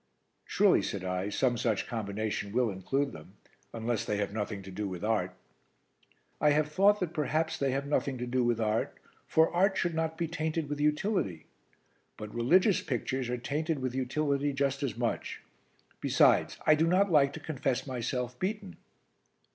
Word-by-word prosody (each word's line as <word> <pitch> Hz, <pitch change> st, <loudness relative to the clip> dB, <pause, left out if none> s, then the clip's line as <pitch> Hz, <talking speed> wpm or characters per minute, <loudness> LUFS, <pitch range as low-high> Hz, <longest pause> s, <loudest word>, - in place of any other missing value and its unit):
"Surely," -, -, +4 dB
said 100 Hz, -2 st, -4 dB
I, 90 Hz, +2 st, -2 dB
"some 120 Hz, +3 st, +1 dB
such 110 Hz, -3 st, 0 dB
combination 105 Hz, -2 st, -3 dB
will 120 Hz, 0 st, +1 dB
include 135 Hz, +10 st, -1 dB
them 75 Hz, -, -12 dB, 0.4 s
unless 115 Hz, 0 st, -2 dB
they 105 Hz, -, -2 dB
have 100 Hz, -1 st, -2 dB
nothing 105 Hz, -2 st, -3 dB
to 95 Hz, -, -9 dB
do 100 Hz, +2 st, -3 dB
with 90 Hz, -1 st, -6 dB
art." 105 Hz, -5 st, 0 dB, 1.1 s
"I 150 Hz, -, +5 dB
have 150 Hz, +1 st, +2 dB
thought 200 Hz, +5 st, +4 dB
that 170 Hz, -2 st, -2 dB
perhaps 155 Hz, +1 st, 0 dB
they 140 Hz, -, 0 dB
have 135 Hz, +2 st, -1 dB
nothing 140 Hz, -2 st, 0 dB
to 125 Hz, -, -3 dB
do 125 Hz, +1 st, 0 dB
with 120 Hz, -1 st, +1 dB
art, 110 Hz, 0 st, -1 dB, 0.3 s
for 160 Hz, +1 st, +3 dB
art 190 Hz, +2 st, +3 dB
should 175 Hz, -2 st, 0 dB
not 160 Hz, 0 st, -2 dB
be 170 Hz, -, -1 dB
tainted 160 Hz, -2 st, -2 dB
with 145 Hz, 0 st, -3 dB
utility; 150 Hz, -, 0 dB, 0.7 s
but 105 Hz, -1 st, -8 dB
religious 180 Hz, -, +3 dB
pictures 130 Hz, 0 st, -2 dB
are 125 Hz, -, -1 dB
tainted 150 Hz, +6 st, -2 dB
with 130 Hz, -2 st, -3 dB
utility 140 Hz, +2 st, 0 dB
just 140 Hz, 0 st, 0 dB
as 130 Hz, -6 st, -2 dB
much. 120 Hz, -1 st, -3 dB, 0.6 s
Besides, -, -, +3 dB
I 155 Hz, -, +7 dB
do 160 Hz, +2 st, +2 dB
not 185 Hz, +3 st, +3 dB
like 140 Hz, -3 st, +5 dB
to 160 Hz, -, -6 dB
confess 140 Hz, -5 st, -2 dB
myself 125 Hz, -1 st, -3 dB
beaten." 200 Hz, -1 st, -3 dB
135 Hz, 170 wpm, -30 LUFS, 110-155 Hz, 1.1 s, I